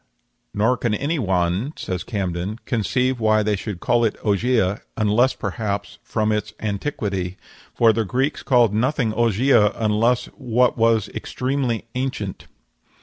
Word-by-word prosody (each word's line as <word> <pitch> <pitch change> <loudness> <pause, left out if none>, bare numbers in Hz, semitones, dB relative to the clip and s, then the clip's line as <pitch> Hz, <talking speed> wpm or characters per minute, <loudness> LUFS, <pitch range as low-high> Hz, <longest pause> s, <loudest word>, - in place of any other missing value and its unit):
"Nor 115 +5 +2
can 115 -3 0
any 145 +7 -1
one," 95 - 0
says 90 -1 -4
Camden, 95 -1 -3
"conceive 125 +2 0
why 110 -1 +3
they 105 0 +1
should 100 -2 -5
call 120 +4 +2
it 110 - 0
Ogygia, 105 -1 +1 0.2
unless, 110 +4 +3
perhaps, 100 -3 -4
from 110 -1 -1
its 105 0 -2
antiquity; 100 -4 -3 0.4
for 115 -2 +5
the 115 +1 0
Greeks 130 +8 -1
called 120 -6 +3
nothing 120 0 +1
Ogygia 115 -1 +3
unless 115 +2 +1
what 125 +1 +1
was 115 -2 +2
extremely 125 -4 -2
ancient." 125 -7 -4
110 Hz, 135 wpm, -22 LUFS, 105-125 Hz, 0.4 s, for